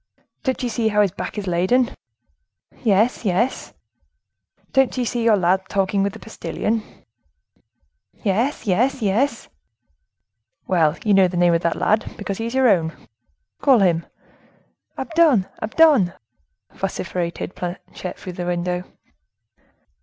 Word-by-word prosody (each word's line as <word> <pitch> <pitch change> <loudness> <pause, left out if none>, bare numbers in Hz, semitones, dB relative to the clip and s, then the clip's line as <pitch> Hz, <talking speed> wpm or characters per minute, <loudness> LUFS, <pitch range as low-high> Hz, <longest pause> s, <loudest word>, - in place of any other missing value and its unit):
"Don't 260 -3 -2
you 245 - 0
see 230 -1 0
how 210 -1 +3
his 195 - 0
back 200 - -6
is 205 - -3
laden?" 190 +8 +2 0.9
"Yes, 220 +3 +2
yes!" 210 +5 -1 1.0
"Don't 270 -1 +3
you 250 - 0
see 240 +1 -2
your 225 -2 +4
lad 185 +1 +2
talking 195 0 +1
with 200 0 0
the - - -10
postilion?" 225 0 -3 1.4
"Yes, 225 +7 0
yes, 235 +6 +1
yes!" 220 +8 0 1.2
"Well, 165 -3 +2
you 210 - +3
know 195 -1 +6
the 175 0 -4
name 175 -1 +4
of 165 - +2
that 170 - 0
lad, 215 +1 0
because 200 -1 -4
he 225 - -2
is 235 - -5
your 265 -1 +4
own. 165 -6 +2 0.7
Call 270 -3 +5
him." 175 -5 +2 0.9
"Abdon! 300 - +3 0.2
Abdon!" 235 - +4 0.6
vociferated 180 -2 -4
Planchet, 180 +1 -6
from 185 - -8
the 175 0 -5
window. 180 0 -1
200 Hz, 130 wpm, -21 LUFS, 180-240 Hz, 1.4 s, know